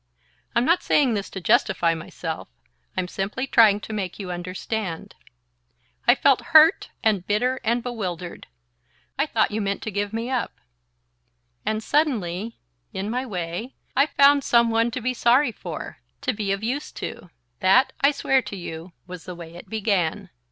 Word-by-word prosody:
I'm 235 - +3
not 340 +5 +3
saying 270 -5 +3
this 200 -2 -3
to 190 - -6
justify 175 -4 +2
myself. 160 0 -6 0.5
I'm 185 -1 0
simply 200 +8 -3
trying 220 -6 +5
to 215 - -7
make 190 -4 -3
you 190 -3 -5
understand. 185 +1 -4 0.9
I - - +7
felt 275 -3 +3 0.2
hurt 315 +3 +6
and 205 -5 +1
bitter 250 +5 +1
and 235 +1 +1
bewildered. 185 -8 -5 0.7
I - - +2
thought - - +1
you 215 +1 -1
meant 200 0 -2
to 220 - -4
give 205 +1 -2
me 230 +3 -3
up. 255 -2 -2 1.1
And 215 0 0
suddenly, 230 - 0 0.3
in 200 +3 -4
my 255 +2 -2
way, 180 +5 -5 0.2
I 275 +3 +4
found 280 -1 +5
some 235 -1 +4
one 230 +1 +2
to 240 +2 -5
be 255 +2 0
sorry 245 +2 +3
for, - - -7 0.2
to - - 0
be 205 -2 -2
of 195 +2 -2
use 260 +6 -2
to. 180 - -7 0.3
That, 195 +8 +4
I 280 - +6
swear 270 -2 +2
to 210 -3 -7
you, 170 -1 -8
was 180 -2 -9
the 180 - -7
way 170 -1 -10
it 175 - -12
began. 200 -7 -1
215 Hz, 165 wpm, -24 LUFS, 185-245 Hz, 1.1 s, I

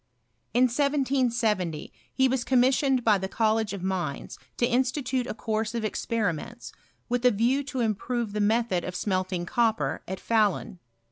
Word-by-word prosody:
In 245 - +5
1770 245 - 0 0.2
he 265 0 +3
was 255 -1 0
commissioned 260 0 +3
by 210 -3 +4
the 190 - -3
College 220 +1 +1
of 200 -3 -6
Mines 180 -7 -3 0.2
to 240 - +2
institute 255 +1 0
a - - -4
course 220 0 -2
of 230 -2 -1
experiments, 220 0 -3 0.4
with 245 0 -1
a 250 - +7
view 245 +6 +1
to 255 -2 -3
improve 230 0 -1
the 210 - -1
method 220 -3 +1
of 180 - -5
smelting 185 -2 -1
copper, 230 +1 0
at 190 0 -5
Fahlun. 215 -3 0
230 Hz, 150 wpm, -27 LUFS, 200-250 Hz, 0.4 s, a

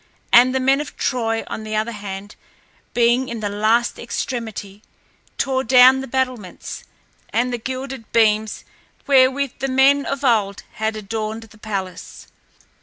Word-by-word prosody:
And 250 +2 +7
the - - +2
men 270 +2 +3
of 295 - -9
Troy, 225 -4 -1
on - - -6
the 215 0 -4
other 215 +2 -1
hand, 205 -1 -7 0.6
being 240 +2 +3
in 235 -1 -5
the 210 -1 -2
last 220 +4 +1
extremity, 220 -4 -5 0.6
tore 265 -1 0
down 255 +2 +6
the 270 - -6
battlements 255 -7 -3 0.5
and 245 +2 0
the 240 - -2
gilded 260 0 -6
beams 215 -1 +2 0.4
wherewith 270 0 +3
the 270 - -1
men 270 +2 +4
of 275 0 -3
old 210 -6 +1
had 220 0 -2
adorned 215 +1 -4
the 215 -1 -17
palace. 195 -4 -6
235 Hz, 145 wpm, -21 LUFS, 215-260 Hz, 0.6 s, And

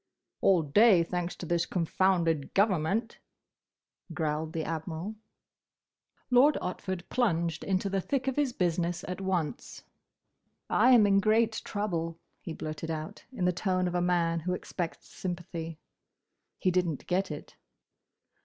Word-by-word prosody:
"All 185 -4 +4
day; 185 +4 +5
thanks 175 +1 -3
to - - -7
this 170 0 0
confounded 170 -3 +1
government," 200 +3 +1 1.0
growled 155 -1 -1
the 160 -2 -2
Admiral. 165 +5 -4 1.2
Lord 270 +4 +6
Otford 185 0 -4
plunged 170 -9 0
into 190 0 0
the 195 0 0
thick 270 +6 -2
of 265 - 0
his 290 -3 +1
business 175 -4 -1
at 180 +2 -4
once. 185 0 -3 0.9
"I 250 - +5
am 225 -4 +7
in 195 -1 +4
great 220 +2 +2
trouble," 170 -6 -3 0.2
he - - -7
blurted 155 +1 -5
out, 155 -1 -5
in 215 -9 -2
the 180 - +3
tone 185 0 0
of 175 - -3
a 175 - +1
man 170 -2 +1
who 180 +3 -2
expects 175 -1 -5
sympathy. 170 -3 -5 0.8
He 185 - +1
didn't 175 -5 0
get 185 +1 0
it. 150 -1 -8
180 Hz, 135 wpm, -29 LUFS, 165-195 Hz, 1.2 s, am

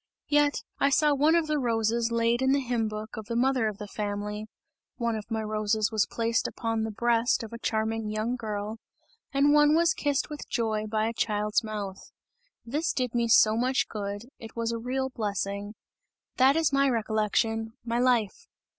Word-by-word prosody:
Yet, 290 -1 +2 0.2
I 280 - +4
saw 295 +1 +3
one 300 +4 +4
of 335 -2 +3
the 305 -1 0
roses 230 -1 +1
laid 230 +1 +2
in 265 +1 +3
the 280 - +3
hymn 240 -4 -1
book 215 +1 -6
of 215 -1 -7
the 230 - -3
mother 255 -1 +2
of 210 -2 -4
the 210 - -7
family; 210 0 -4 0.5
one 235 -2 -1
of 215 0 -6
my 220 -1 -2
roses 215 0 0
was 215 -2 +1
placed 230 0 0
upon 225 -1 -2
the 220 - -1
breast 235 +2 +1
of 225 - -8
a 230 - -6
charming 220 -1 -1
young 215 +3 -1
girl, 215 -1 -4 0.5
and 280 +1 +4
one 295 0 +5
was 335 0 +4
kissed 285 -1 0
with 300 -1 -8
joy 220 -2 -1
by 215 0 0
a 230 - -2
child's 210 0 0
mouth. 205 -3 -6 0.6
This 300 +8 -1
did 250 -4 -1
me 235 -1 +1
so 220 -1 +6
much 255 +3 +1
good, 205 0 -4 0.2
it 225 -1 -10
was 230 0 -1
a 230 - -3
real 265 +3 -2
blessing! 205 -2 -3 0.6
That 265 +2 +5
is 320 -3 +2
my 275 0 +4
recollection, 225 -1 0
my 235 0 0
life!" 245 -5 +1
230 Hz, 190 wpm, -27 LUFS, 215-255 Hz, 0.6 s, so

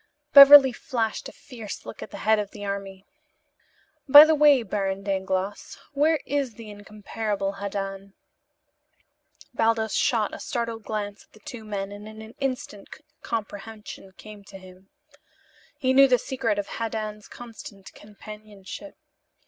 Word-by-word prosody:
Beverly 280 -1 +10
flashed 230 -3 -4
a - - -13
fierce 235 -7 -10
look - - -10
at - - -8
the - - -9
head 220 0 +3
of 205 -1 -4
the 205 -1 -9
army. 195 -1 -6 1.0
"By 290 +3 +11
the 315 - +2
way, 290 -4 +4
Baron 195 -1 -3
Dangloss, 190 0 -3 0.2
where 305 +2 +2
is 275 -5 -2
the 220 -2 -11
incomparable 205 -1 -5
Haddan?" 195 0 -6 1.4
Baldos 225 -2 0
shot 220 -4 0
a - - -7
startled 230 -3 -5
glance 205 -1 -5
at - - -44
the 215 - -18
two 245 -7 -9
men 200 -2 -5
and 205 +1 -10
in 220 0 -11
an 220 +1 -13
instant 255 -7 -5 0.3
comprehension 210 -3 -7
came 210 0 -13
to 195 - -12
him. 185 0 -17 0.9
He 260 -3 0
knew 275 +1 +7
the 250 -1 +3
secret 245 -4 -3
of 205 - -2
Haddan's 215 -1 -5
constant 220 -4 -12
companionship. 210 +4 -12
215 Hz, 140 wpm, -24 LUFS, 200-240 Hz, 1.4 s, By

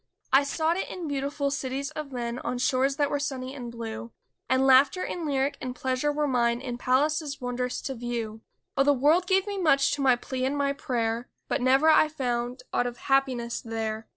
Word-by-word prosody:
I 270 - +8
sought 315 +4 0
it - - -3
in 350 -3 -5
beautiful 280 0 -1
cities 275 +1 -3
of 305 -2 -6
men, 240 -1 -3
On 245 0 -3
shores 260 +2 +1
that 285 0 0
were 285 - 0
sunny 265 -2 -4
and 245 -4 -7
blue. 230 0 -6 0.4
And 260 +1 +3
laughter 270 +7 +5
and 340 -3 -4
lyric 275 0 0
and 250 -1 -4
pleasure 260 +3 0
were 300 0 0
mine 235 -2 +2
In 245 -2 -5
palaces 290 +3 +1
wondrous 250 0 -2
to 270 - -3
view; 230 -3 -4 0.3
Oh, - - +3
the 285 +1 +4
world 305 +7 +3
gave 380 +1 +3
me 405 -1 -4
much 280 -6 +3
to 290 - -2
my 260 -2 +5
plea 255 +1 -4
and 270 +2 0
my 280 0 +1
prayer 235 -3 -2 0.2
But 280 - -1
never 265 +4 +4
I 310 0 +6
found 250 -3 -3
aught 245 - +1
of 240 0 -6
happiness 260 -4 0
there! 225 -1 -4
265 Hz, 205 wpm, -27 LUFS, 245-285 Hz, 0.4 s, I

